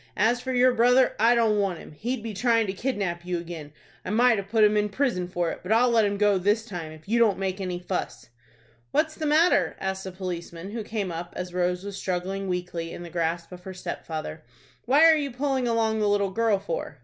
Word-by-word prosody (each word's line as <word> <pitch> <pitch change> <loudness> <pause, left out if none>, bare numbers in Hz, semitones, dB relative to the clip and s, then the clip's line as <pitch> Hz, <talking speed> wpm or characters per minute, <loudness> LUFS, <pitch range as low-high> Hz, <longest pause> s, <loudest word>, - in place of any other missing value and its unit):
As 240 +2 +2
for 260 - -4
your 250 0 +4
brother, 245 +2 +4
I 230 +3 +5
don't 220 -3 +3
want 195 -4 0
him. - - -12
He'd 230 - -4
be 225 -2 -5
trying 230 +2 +2
to 190 - -3
kidnap 195 -7 -2
you 180 0 -2
again. 165 -3 -7 0.3
I - - -6
might 235 +1 +4
have 195 0 -7
put 220 0 +3
him 210 0 +5
in 210 0 +1
prison 205 -6 -1
for 175 -2 -1
it; - - -7
but 185 - -5
I'll 240 +2 +4
let 225 -2 +4
him 200 0 -1
go 205 -2 +3
this 210 +4 +1
time, 175 -7 -6
if 155 +2 -14
you 235 +3 +2
don't 220 -4 +4
make 190 0 -3
any 180 -2 -3
fuss." 175 -10 -5 0.6
"What 315 - +2
is - - -13
the 310 -1 -3
matter?" 320 +4 +3
asked 190 0 -3
a - - -5
policeman, 180 0 -6
who 225 0 -4
came 205 -4 -3
up 170 +1 -6
as 180 -1 -5
Rose 180 0 0
was 200 -1 -6
struggling 190 +2 -3
weakly 180 -2 -3
in 175 - -7
the 170 - -9
grasp 170 0 -2
of 180 -1 -10
her 190 0 -8
stepfather. 160 -3 -6 0.4
"What 275 +6 +5
are 325 -1 +8
you 290 -2 -1
pulling 265 0 -1
along 225 -1 +1
the 210 -1 +2
little 200 -1 +1
girl 225 0 +2
for?" 170 -6 -5
200 Hz, 235 wpm, -26 LUFS, 180-230 Hz, 0.6 s, are